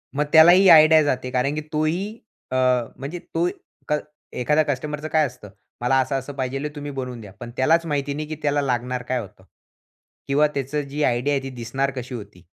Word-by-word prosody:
मग 150 - +2
त्याला 160 +2 +9
ही 190 +2 +6
आयडिया 155 -1 +8
जाते. 130 -3 -1
कारण 135 +4 0
की 155 - -2
तो 155 +1 +1
ही 195 +8 -2 0.3
अ, - - -1 0.4
म्हणजे 150 +6 -6
तो 170 +2 +1 0.4
क 150 - +2 0.4
एखाद्या 150 +5 +3
कस्टमरचं 150 +2 -3
काय 155 0 +2
असतं? 125 -6 -9 0.3
मला 125 +2 +2
असं-असं 135 +1 -2
पाहिजे 135 +2 -3
तुम्ही 145 0 -6
बनवून 125 -3 -6
द्या. 100 - -11
पण 120 0 -8
त्यालाच 165 +6 +3
माहिती 145 -2 -2
नाही 150 +1 -5
की 155 - -5
त्याला 145 -1 +1
लागणार 125 -1 -2
काय 125 +1 -1
होतं 105 -3 -11 0.8
किंवा 145 +2 +3
त्याचं 140 +2 -2
जी 150 +2 -2
आयडिया 125 +4 +1
आहे 135 - -1
ती 135 - -5
दिसणार 130 +4 -2
कशी 125 0 -6
होती? 100 -5 -10
140 Hz, 195 wpm, -23 LUFS, 125-150 Hz, 0.8 s, त्याला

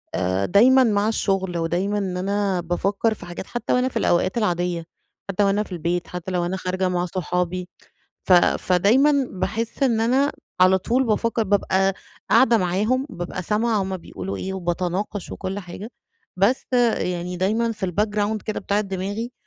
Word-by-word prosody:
آآ، 95 +1 0
دايمًا 255 +7 +6
مع 210 -2 +2
الشغل، 195 -5 0
ودايمًا 175 +5 -1
إن 185 -3 -2
أنا 195 -1 0
بافكّر 195 +6 0
في - - -10
حاجات 175 +2 -7
حتّى 240 - -2
وأنا 250 +1 +2
في - - -4
الأوقات 185 +5 +1
العاديّة، 175 -5 -1 0.4
حتّى 195 +2 +1
لو 200 - +3
أنا 205 +2 +1
في 200 - -16
البيت، 175 +1 -2
حتّى 180 +1 -6
لو 175 -1 0
أنا 190 +2 -2
خارجة 185 0 -1
مع 180 0 0
صحابي، 180 0 -2 0.5
ف 185 - +4
فدايمًا 245 +11 +4
باحس 220 +8 -2
إن 230 -4 +2
أنا 265 +5 +2 0.3
على 185 +1 +6
طول 245 +8 +1
بافكّر، 225 +1 +1
بابقى 195 -1 +2 0.4
قاعدة 230 0 +6
معاهم، 210 +9 0
بابقى 180 -2 -5
سامعة 215 +1 +1
هُم 190 0 -3
بيقولوا 95 - -6
إيه، 190 0 -4
وباتناقش 185 +2 -3
وكُلّ 195 +1 -4
حاجة، 190 +4 -8 0.5
بس 210 +8 +2 0.3
يعني 180 0 -3
دايمًا 225 +5 +1
في 195 -3 -3
الbackground 210 +2 -1
كده 215 - -3
بتاعة 200 +2 0
دماغي 200 +4 -4
195 Hz, 165 wpm, -23 LUFS, 180-220 Hz, 0.5 s, دايمًا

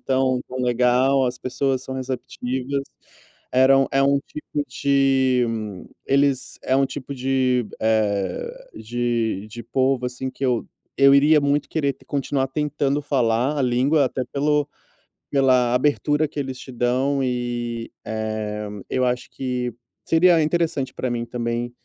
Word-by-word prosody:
tão 130 -1 +1
tão 130 - -7
legal, 125 +2 +3
as 125 - -2
pessoas 130 0 -1
são 130 - -6
receptivas, 130 +1 -3 0.7
era 130 +1 +6
um 135 - +3
é 135 0 +3
um 140 0 +3
tipo 150 -1 -4
de 135 -2 +2 0.6
eles 140 -1 +1
é 130 - +1
um 135 0 +3
tipo 140 0 -7
de, 130 -2 +1
eh, 105 -4 -1
de 115 -2 -2
de 115 +2 -8
povo 130 -1 0
assim, 125 +1 -4
que 135 - -6
eu 125 -3 0 0.3
eu 140 0 +6
iria 150 +2 +5
muito 145 0 +1
querer 140 -4 0
continuar 140 -1 -1
tentando 145 0 -1
falar 130 +1 +1
a - - +1
língua, 130 +4 +3
até 130 - -3
pelo 150 +1 +1 0.6
pela 130 -3 +3
abertura 150 +3 +2
que 150 - -6
eles 130 -2 -4
te 130 - -10
dão, 130 +3 +1
e, 120 -2 -3
eh, 110 -1 -3 0.2
eu 130 -1 +1
acho 125 0 -1
que 125 -2 -3 0.3
seria 165 0 +5
interessante 155 -5 0
para 130 - -3
mim 120 -1 -2
também, 120 0 -3
130 Hz, 145 wpm, -22 LUFS, 120-140 Hz, 0.7 s, era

